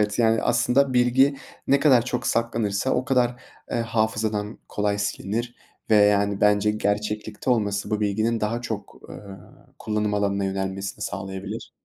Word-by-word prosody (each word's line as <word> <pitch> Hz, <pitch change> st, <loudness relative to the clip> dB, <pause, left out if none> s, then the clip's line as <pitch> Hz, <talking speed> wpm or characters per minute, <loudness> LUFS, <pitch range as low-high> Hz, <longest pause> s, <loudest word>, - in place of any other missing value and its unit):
Evet, 105 Hz, +1 st, 0 dB
yani, 115 Hz, -1 st, +3 dB
aslında, 125 Hz, +3 st, +2 dB
bilgi 130 Hz, +3 st, +4 dB, 0.3 s
ne 140 Hz, 0 st, +3 dB
kadar 130 Hz, -6 st, +5 dB
çok 125 Hz, 0 st, -3 dB
saklanırsa 115 Hz, -1 st, 0 dB
o 125 Hz, -, +1 dB
kadar, 125 Hz, -2 st, +1 dB, 0.3 s
eee, -, -, -1 dB
hafızadan 110 Hz, -2 st, -1 dB
kolay 105 Hz, 0 st, -1 dB
silinir 110 Hz, +4 st, -3 dB, 0.4 s
ve, -, -, +6 dB
yani, 100 Hz, -1 st, +3 dB
bence 105 Hz, 0 st, +3 dB
gerçeklikte 105 Hz, +2 st, -2 dB
olması 105 Hz, -4 st, 0 dB
bu 105 Hz, 0 st, 0 dB
bilginin 110 Hz, +3 st, 0 dB
daha 110 Hz, +3 st, -1 dB
çok, 110 Hz, -4 st, -6 dB
eee, -, -, -8 dB, 0.6 s
kullanım 105 Hz, -1 st, -1 dB
alanına 100 Hz, -1 st, 0 dB
yönelmesini 95 Hz, 0 st, -3 dB
sağlayabilir. 95 Hz, +2 st, -6 dB
105 Hz, 140 wpm, -24 LUFS, 100-120 Hz, 0.6 s, ve